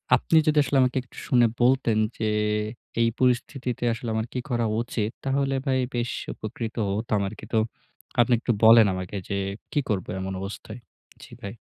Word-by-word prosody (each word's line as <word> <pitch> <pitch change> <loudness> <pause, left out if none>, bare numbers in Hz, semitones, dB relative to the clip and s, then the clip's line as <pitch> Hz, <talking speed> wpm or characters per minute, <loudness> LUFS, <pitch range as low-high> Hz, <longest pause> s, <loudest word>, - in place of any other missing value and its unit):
আপনি 160 +5 +2
যদি 155 -1 +4 0.2
আমাকে 130 +1 +2
একটু 125 - -19
শুনে 125 -4 +5 0.2
বলতেন 120 -3 +3 0.2
যে 110 - 0 0.8
এই 115 - +4
পরিস্থিতিতে 125 0 0
আসলে 115 +1 -5
আমার 110 +1 -1
কি 125 - -1
করা 120 -2 +1 0.2
উচিত 115 -3 -2 0.2
তাহলে 135 0 +1
ভাই 130 -2 +2 0.2
বেশ 120 0 -1 0.2
উপকৃত 110 +1 -6 0.2
হতাম 105 0 0
আরকি। 105 +1 -9
তো - - +3 0.6
আপনি 120 +1 +3
একটু 120 - 0
বলেন 115 0 +9
আমাকে 95 +1 -5
যে 100 - -1 0.4
কি - - +1
করব 95 -4 0
এমন 95 0 -4
অবস্থায়? 105 +3 -7 0.4
জি - - -14
ভাই। 100 +2 -6
120 Hz, 165 wpm, -25 LUFS, 110-125 Hz, 0.8 s, বলেন